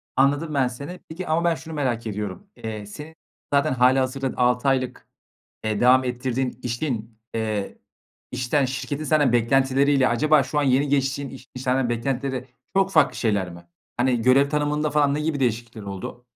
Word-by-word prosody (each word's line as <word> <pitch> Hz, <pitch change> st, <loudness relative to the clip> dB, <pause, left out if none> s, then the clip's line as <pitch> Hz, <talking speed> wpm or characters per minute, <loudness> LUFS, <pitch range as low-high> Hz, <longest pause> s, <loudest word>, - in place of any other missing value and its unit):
Anladım, 145 Hz, +4 st, +2 dB
ben, 135 Hz, -3 st, +2 dB
seni, 140 Hz, +9 st, -7 dB
peki 175 Hz, +3 st, -6 dB
ama 160 Hz, +2 st, +1 dB
ben 170 Hz, -1 st, +2 dB
şunu 160 Hz, 0 st, -9 dB
merak 120 Hz, -6 st, -1 dB
ediyorum. 105 Hz, -, -5 dB
Eee, 110 Hz, -2 st, -6 dB
senin 150 Hz, +10 st, -10 dB, 0.4 s
zaten 140 Hz, 0 st, +3 dB
hâlihazırda 130 Hz, +1 st, +2 dB
6 125 Hz, +2 st, +2 dB
aylık, 130 Hz, -2 st, 0 dB, 0.6 s
eee, 110 Hz, -1 st, -1 dB
devam 130 Hz, +1 st, +6 dB
ettirdiğin 125 Hz, 0 st, -2 dB
işin, 115 Hz, -3 st, -3 dB
eee, 110 Hz, -3 st, -2 dB, 0.5 s
işten 130 Hz, +3 st, +1 dB
şirketin 140 Hz, +3 st, -4 dB
senden 145 Hz, -5 st, +3 dB
beklentileriyle 135 Hz, +3 st, +3 dB
acaba 150 Hz, +4 st, +3 dB
şu 150 Hz, +3 st, -1 dB
an -, -, +1 dB
yeni 135 Hz, +2 st, +3 dB
geçtiğin 140 Hz, 0 st, 0 dB
iş 130 Hz, -1 st, -12 dB
iş 125 Hz, -, -6 dB
senden 130 Hz, -1 st, +1 dB
beklentileri 130 Hz, +2 st, -2 dB, 0.3 s
çok 195 Hz, 0 st, +3 dB
farklı 155 Hz, -5 st, +4 dB
şeyler 100 Hz, -6 st, 0 dB
mi? 85 Hz, 0 st, -13 dB, 0.3 s
Hani 120 Hz, -1 st, +2 dB
görev 135 Hz, +3 st, +4 dB
tanımında 150 Hz, 0 st, 0 dB
falan 145 Hz, -1 st, +3 dB
ne 150 Hz, -, -1 dB
gibi 155 Hz, -2 st, -1 dB
değişiklikler 115 Hz, -2 st, -2 dB
oldu? 100 Hz, +5 st, -7 dB
130 Hz, 165 wpm, -24 LUFS, 120-145 Hz, 0.6 s, devam